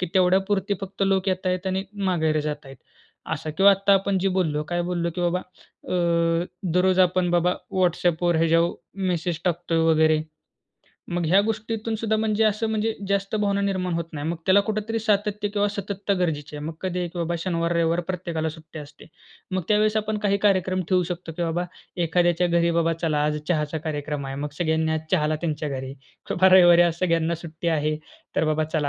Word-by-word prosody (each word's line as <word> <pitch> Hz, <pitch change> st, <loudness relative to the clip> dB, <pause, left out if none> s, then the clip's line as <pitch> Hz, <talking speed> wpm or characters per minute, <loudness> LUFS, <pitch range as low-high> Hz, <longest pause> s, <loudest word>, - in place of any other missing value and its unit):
की 180 Hz, -, 0 dB
तेवढ्यापुरती 195 Hz, +2 st, +2 dB
फक्त 195 Hz, 0 st, -5 dB
लोक 195 Hz, 0 st, +1 dB
येत 185 Hz, 0 st, -1 dB
आहेत 185 Hz, 0 st, -1 dB
आणि 190 Hz, +1 st, -1 dB, 0.2 s
माघेर 160 Hz, -4 st, +1 dB
जात 150 Hz, 0 st, -4 dB
आहेत, 135 Hz, 0 st, -11 dB, 0.6 s
असं. 155 Hz, -1 st, -5 dB
किंवा 195 Hz, +1 st, +7 dB
आत्ता 195 Hz, 0 st, +3 dB
आपण 195 Hz, 0 st, +1 dB
जे 195 Hz, +1 st, +1 dB
बोललो, 150 Hz, -4 st, 0 dB
काय 175 Hz, 0 st, -1 dB
बोललो? 170 Hz, -1 st, -1 dB
की 180 Hz, -, -3 dB
बाबा, 175 Hz, +1 st, +1 dB, 0.5 s
अ, 170 Hz, -1 st, +1 dB, 0.3 s
दररोज 185 Hz, +1 st, +3 dB
आपण 180 Hz, -1 st, +3 dB
बाबा, 175 Hz, +1 st, +2 dB, 0.3 s
WhatsAppवर 175 Hz, -1 st, +2 dB
हे 165 Hz, -, +3 dB
ज्या 165 Hz, +1 st, +4 dB, 0.5 s
मेसेज 170 Hz, -1 st, -1 dB
टाकतोय 175 Hz, -2 st, 0 dB
वगैरे, 155 Hz, -1 st, +4 dB, 0.9 s
मग 175 Hz, -1 st, 0 dB
ह्या 185 Hz, +5 st, +5 dB
गोष्टीतून 220 Hz, +1 st, -2 dB
सुद्धा 220 Hz, 0 st, 0 dB
म्हणजे 220 Hz, 0 st, +1 dB
असं 215 Hz, +1 st, +1 dB
म्हणजे 220 Hz, +1 st, 0 dB, 0.2 s
जास्त 200 Hz, +1 st, -1 dB
भावना 200 Hz, -1 st, +1 dB
निर्माण 185 Hz, -2 st, -1 dB
होत 170 Hz, 0 st, -1 dB
नाही. 145 Hz, 0 st, -5 dB
मग 170 Hz, -, -2 dB
त्याला 195 Hz, +1 st, +6 dB
कुठेतरी 215 Hz, +2 st, -2 dB
सातत्य 210 Hz, -1 st, 0 dB
किंवा 205 Hz, 0 st, 0 dB
सतत्ता 200 Hz, 0 st, -3 dB
गरजेची 155 Hz, -5 st, -2 dB
आहे. 145 Hz, -, -6 dB
मग 160 Hz, -, -4 dB
कधीही, 180 Hz, -1 st, -2 dB
की 175 Hz, -, -8 dB
बाबा 170 Hz, 0 st, -1 dB
शनिवार, 170 Hz, -1 st, -1 dB
रविवार 170 Hz, 0 st, +1 dB
प्रत्येकाला 170 Hz, -3 st, -2 dB
सुट्टी 160 Hz, 0 st, -10 dB
असते. 145 Hz, -1 st, -12 dB, 0.4 s
मग 185 Hz, -1 st, -1 dB
त्यावेळेस 215 Hz, 0 st, +3 dB
आपण 215 Hz, 0 st, -1 dB
काही 200 Hz, 0 st, +3 dB
कार्यक्रम 185 Hz, -2 st, +2 dB
ठेवू 185 Hz, -1 st, +3 dB
शकतो, 175 Hz, -1 st, -5 dB
की 175 Hz, -, -2 dB
बाबा 170 Hz, +1 st, -1 dB, 0.4 s
एखाद्याच्या 175 Hz, +1 st, +2 dB
घरी 170 Hz, 0 st, +2 dB
बाबा 165 Hz, 0 st, +2 dB
चला 150 Hz, -3 st, +1 dB
आज 150 Hz, 0 st, 0 dB
चहाचा 155 Hz, -2 st, 0 dB
कार्यक्रम 150 Hz, -2 st, -4 dB
आहे. 135 Hz, -, -5 dB
मग 145 Hz, +1 st, -3 dB
सगळ्यांनी 160 Hz, -1 st, +1 dB
आज 160 Hz, -, -1 dB
चहाला 155 Hz, 0 st, +2 dB
त्यांच्या 155 Hz, -2 st, -2 dB
घरी 130 Hz, -1 st, -5 dB, 0.4 s
किंवा 190 Hz, +2 st, +4 dB
रविवारी 175 Hz, -2 st, +7 dB
आज 170 Hz, -2 st, +2 dB
सगळ्यांना 165 Hz, -2 st, +1 dB
सुट्टी 165 Hz, 0 st, -5 dB
आहे 155 Hz, -1 st, 0 dB, 0.4 s
तर -, -, +3 dB
बाबा 155 Hz, 0 st, +1 dB
चला 155 Hz, -2 st, -1 dB
175 Hz, 190 wpm, -24 LUFS, 160-195 Hz, 0.9 s, किंवा